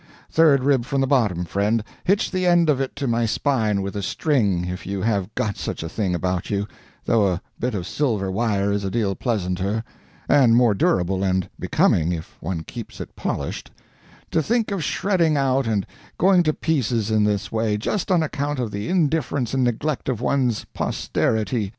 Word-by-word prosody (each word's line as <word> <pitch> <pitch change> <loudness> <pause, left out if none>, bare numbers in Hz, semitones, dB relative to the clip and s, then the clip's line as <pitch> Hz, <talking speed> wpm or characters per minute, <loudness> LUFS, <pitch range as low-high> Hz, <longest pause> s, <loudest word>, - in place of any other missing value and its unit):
third 150 -5 +5
rib 135 -3 +3
from 135 +3 -2
the 135 - +3
bottom, 110 -11 +1
friend, 105 +5 0 0.2
hitch 195 +3 +2
the 185 -1 0
end 170 -3 +5
of 135 -2 0
it 135 - -3
to 140 -1 -3
my 120 -1 +1
spine 110 -4 +1
with 100 +1 -5
a 100 - -2
string, 100 - +1
if 90 +1 -5
you 100 +1 -4
have 100 -1 0
got 105 -3 -1
such - - -4
a - - -4
thing 95 -1 -1
about 90 0 -2
you, 100 0 -1 0.4
though 110 -4 +3
a 90 -2 0 0.2
bit 125 -2 -1
of 90 -3 -3
silver 105 -7 -1
wire 100 -1 0
is 100 0 -1
a 95 - -1
deal 100 -2 0
pleasanter, 100 -1 -1 0.4
and 130 -5 +5
more 120 -3 +5
durable 95 -1 +1
and 95 -2 +1
becoming, 85 +1 +2
if 80 -2 -6
one 80 -1 -4
keeps 115 +5 -9
it - - -8
polished - - -4 0.6
to 160 - +2
think 225 +4 0
of 195 -5 -2
shredding 170 -6 +1
out 135 -2 +1
and 105 -4 0 0.3
going 185 0 +5
to 155 -3 +2
pieces 120 -9 0
in 110 -1 +3
this 105 -1 0
way, 110 -2 0
just 180 - -2
on 175 -4 +3
account 145 -1 -2
of 120 -4 -2
the 100 +1 -4
indifference 150 -8 0
and 130 -1 +2
neglect 130 +5 -1
of 125 -5 -1
one's 125 -3 0
posterity!" 110 -1 -1
115 Hz, 190 wpm, -23 LUFS, 100-140 Hz, 0.6 s, third